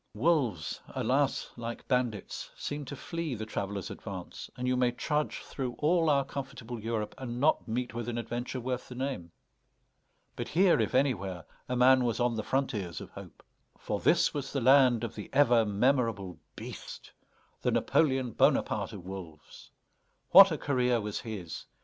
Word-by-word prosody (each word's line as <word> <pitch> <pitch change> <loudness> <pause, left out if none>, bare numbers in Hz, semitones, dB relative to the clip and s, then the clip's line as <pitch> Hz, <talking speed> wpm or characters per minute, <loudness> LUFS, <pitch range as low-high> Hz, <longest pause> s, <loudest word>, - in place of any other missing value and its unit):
Wolves, 120 - 0
alas! - - 0
like 115 0 -6
bandits, 125 -5 -1
seem 145 0 -4
to 140 - -6
flee 165 -1 -4
the 110 0 -5
traveler's 100 -3 -4
advance, - - -8
and 125 0 -2
you 125 - +2
may 125 -1 +3
trudge 150 +5 -2
through 130 -3 -4
all 165 +1 +3
our 140 -2 +3
comfortable 135 -4 -6
Europe 110 -1 -2
and 120 -2 -5
not 150 0 +2
meet 120 +2 -2
with 120 0 -4
an 120 - -3
adventure 120 +2 -4
worth 125 0 -3
the 125 - -8
name. 130 -10 -4 1.0
But - - -4
here, 175 -3 +4
if 110 +3 -1
anywhere, 100 - 0 0.2
a 125 - 0
man 130 +1 +6
was 115 -1 0
on 120 -1 +1
the 110 - -1
frontiers 105 - -2
of - - -10
hope. - - -12 0.3
For - - -3
this - - +3
was 140 -2 -4
the 140 - -1
land 130 -2 +5
of 115 -1 -3
the 105 - -8
ever 120 -5 +5
memorable 105 - +1 0.2
BEAST, - - -9 0.5
the - - +1
Napoléon 130 -6 +1
Bonaparte - - +2
of 95 -4 -9
wolves. 90 -5 -10 0.6
What 195 +1 +10
a 160 - -1
career 125 -4 +1
was 105 -1 -3
his! 100 -8 -7
125 Hz, 165 wpm, -30 LUFS, 110-135 Hz, 1.0 s, What